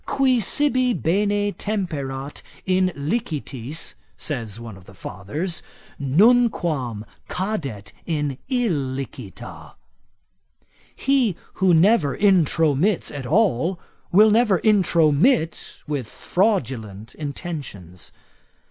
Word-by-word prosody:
Qui 260 -2 +2
sibi 255 0 +2
bene 205 +4 +1
temperat 145 -11 -4 0.2
in 185 0 +2
licitis, 145 - -3 0.2
says 115 -7 -4
one 115 -3 -8
of 95 -1 -15
the 100 - -15
fathers, 145 - -4 0.4
nunquam 150 - +2 0.2
cadet 160 - -4 0.2
in 150 -5 -2
illicita. 135 - -3 1.2
He 260 -9 +2 0.3
who 185 -3 +5
never 165 - +3
intromits 170 -2 +2
at 135 -3 -5
all, 180 - +2 0.3
will 210 +4 +6
never 215 -3 +4
intromit 170 - +2
with 140 -6 -3
fraudulent 120 - -1
intentions. 140 - -7
160 Hz, 85 wpm, -22 LUFS, 135-205 Hz, 1.2 s, will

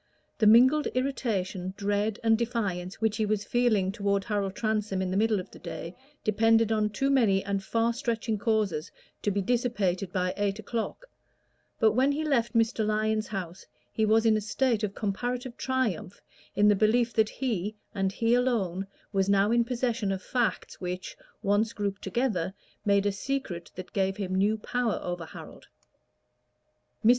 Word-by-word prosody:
The 215 - +5
mingled 260 +7 +6
irritation, 195 -8 -2
dread 205 +1 0
and 225 -1 +5
defiance 205 -6 -2
which 220 -1 +1
he 220 - +1
was 210 -1 0
feeling 220 -6 +2
toward 200 -1 0
Harold 200 -3 -2
Transome 215 -3 -1
in 185 -1 -1
the - - -1
middle 215 0 +2
of 185 - -8
the - - -13
day 165 0 -6 0.3
depended 225 +1 +3
on 215 -1 +2
too 270 +7 0
many 205 -8 +3
and 200 0 -1
far 230 +3 +1
stretching 230 -3 -2
causes 205 -7 0 0.3
to - - 0
be 200 0 0
dissipated 200 -6 0
by 185 -1 0
eight 205 -1 0
o'clock; 225 - -4 0.7
but 220 -1 +5
when 260 +5 +3
he 305 +2 -2
left 245 -6 +1
Mr. 225 0 +2
Lyon's 215 0 0
house 185 -3 -5 0.3
he 220 - 0
was 220 +1 +4
in 220 -1 +5
a 215 - 0
state 225 +2 0
of 200 -1 -2
comparative 245 +4 -3
triumph 250 -9 -2 0.4
in 205 +1 +4
the 205 - +6
belief 230 +3 +2
that 220 -1 +3
he, 215 -6 -2 0.2
and 195 -1 0
he 230 +4 +1
alone, 205 -7 +1 0.3
was 195 0 +1
now 200 +1 +4
in 235 0 +4
possession 235 -3 -1
of 190 -1 -3
facts 245 -3 -1
which, 180 0 -4 0.3
once 210 +3 +2
grouped 200 -1 -3
together, 200 -8 -1 0.3
made 200 -1 +3
a 205 - +3
secret 200 -5 -4
that 185 0 -9
gave 195 0 0
him 190 -2 -3
new 205 +3 +2
power 240 +1 -1
over 175 -1 -4
Harold. - - -11 1.4
Mr. - - +7
215 Hz, 170 wpm, -28 LUFS, 195-230 Hz, 1.4 s, Mr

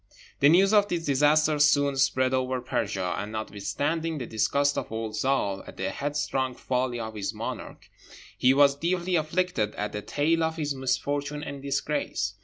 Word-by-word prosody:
The 140 - +6
news 195 +5 +5
of 205 -1 +5
this 170 -4 -2
disaster 150 +2 +3
soon 145 -1 +4
spread 130 -1 +2
over 130 0 0
Persia, 100 -7 -2
and 105 +1 -5
notwithstanding 145 +10 -2
the 130 - -4
disgust 140 +6 +1
of - - -4
old 110 -1 -3
Zâl 110 -6 0
at - - -11
the 95 0 -2
headstrong 135 -1 -2
folly 125 -1 -1
of 110 -1 -5
his 100 -2 -4
monarch, - - -6 0.5
he 125 - +4
was 140 0 +5
deeply 175 +4 -1
afflicted 155 -8 0
at 105 0 -3
the 105 - -4
tale 160 +8 0
of 160 0 -1
his 145 -2 -1
misfortune 145 +2 -2
and 140 -1 -6
disgrace. 140 -7 -2
140 Hz, 170 wpm, -27 LUFS, 115-150 Hz, 0.5 s, The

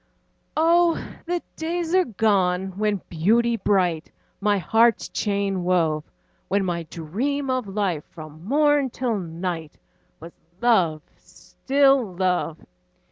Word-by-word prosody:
Oh! 335 +1 +4 0.3
the 350 0 -1
days 335 +1 -3
are 370 -1 +4
gone, 190 - +1
when 205 -2 0
Beauty 230 +8 +2
bright 180 -7 0 0.3
My 205 0 +2
heart's 225 +6 +3
chain 200 -3 -1
wove; 165 -4 +1 0.4
When 195 +1 +1
my 170 -2 -3
dream 260 - -2
of 255 -4 -1
life, 190 -6 -2
from 155 0 -11
morn 290 +4 +2
till 235 -3 -2
night, 165 -2 -5 0.4
Was 165 +2 -11 0.3
love, 180 -10 +2
still 270 -7 0
love. 180 -3 0
200 Hz, 115 wpm, -23 LUFS, 175-255 Hz, 0.4 s, Oh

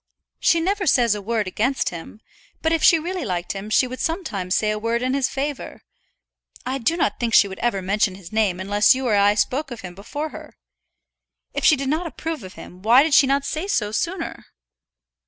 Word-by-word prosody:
"She 335 - +3
never 385 +3 -1
says 235 -4 +4
a 210 - -5
word 220 +1 -1
against 240 +8 0
him; 175 +5 -10 0.4
but 320 0 +2
if 325 - +1
she 330 - +6
really 350 +2 -4
liked 180 -5 -3
him 200 +2 -6
she 235 - +3
would 255 +1 -7
sometimes 210 - -2
say 215 -1 +1
a 215 - -3
word 230 +2 -1
in 255 +1 0
his 275 -2 +1
favour. 280 +1 -5 0.8
I 265 +2 -2
do 325 +8 0
not 210 - 0
think 235 -2 0
she 200 - +6
would 190 -1 -9
ever 215 -5 -1
mention 195 0 0
his 185 -3 -12
name 210 -5 +1
unless 205 +6 +3
you 260 0 -3
or 235 - +1
I 205 +1 +4
spoke 270 +7 0
of 240 -3 -8
him 180 -1 -8
before 290 - -5
her. - - -12 1.0
If - - -3
she 310 - +6
did 275 -1 -3
not 320 +4 -1
approve 320 -2 -5
of 185 -2 -10
him, 180 - -12
why 235 +6 +6
did 315 -1 -1
she 270 - +6
not 275 +1 +1
say 315 +6 -3
so 210 - 0
sooner?" 335 - -3
240 Hz, 215 wpm, -22 LUFS, 205-300 Hz, 1.0 s, she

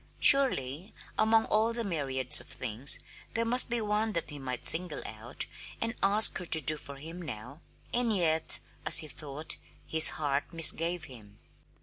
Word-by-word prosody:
Surely 185 - +3 0.2
among 220 +1 +1
all 220 +2 0
the 235 0 -5
myriad 135 - -4
things 125 +3 0 0.4
there 230 +1 -1
must 245 +2 +3
be 240 0 -1
one 215 0 -3
that 170 -3 -4
he 145 - -10
might 125 -2 -8
single 165 -1 +4
out 110 +4 -5 0.3
and 225 0 -4
ask 205 +2 +2
her 180 - -8
to 160 - +3
do 155 +1 +1
for 140 -1 -12
him 165 +6 -11
now! 130 0 -11 0.3
And 240 -1 0
yet, 160 -5 +1 0.3
as - - +8
he 160 -2 +2
thought, 150 +1 -4 0.3
his 160 0 +6
heart 145 -1 -4
misgave 165 0 +4
him. 110 -8 -15
160 Hz, 160 wpm, -27 LUFS, 140-215 Hz, 0.4 s, as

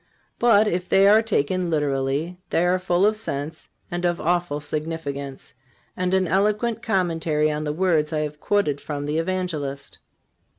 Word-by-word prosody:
But, 220 -3 +5
if 180 -2 -2
they 195 +1 +5
are 215 +2 +7
taken 185 -4 0
literally, 145 +3 -1
they 170 - +2
are 180 +1 +2
full 180 +1 +2
of 215 +1 +3
sense 155 -7 -5 0.2
and 175 0 -3
of 175 -1 +1
awful 175 -3 0
significance, 145 -2 -5 0.4
and 185 +1 0
an 190 -1 +2
eloquent 210 +5 +1
commentary 165 -8 +1
on 150 +1 -3
the 150 - -1
words 160 -2 +1
I 155 -1 0
have 150 0 -4
quoted 150 -9 0
from 145 -1 -4
the 150 +2 -1
Evangelist. 165 -6 -3
170 Hz, 160 wpm, -23 LUFS, 150-185 Hz, 0.4 s, are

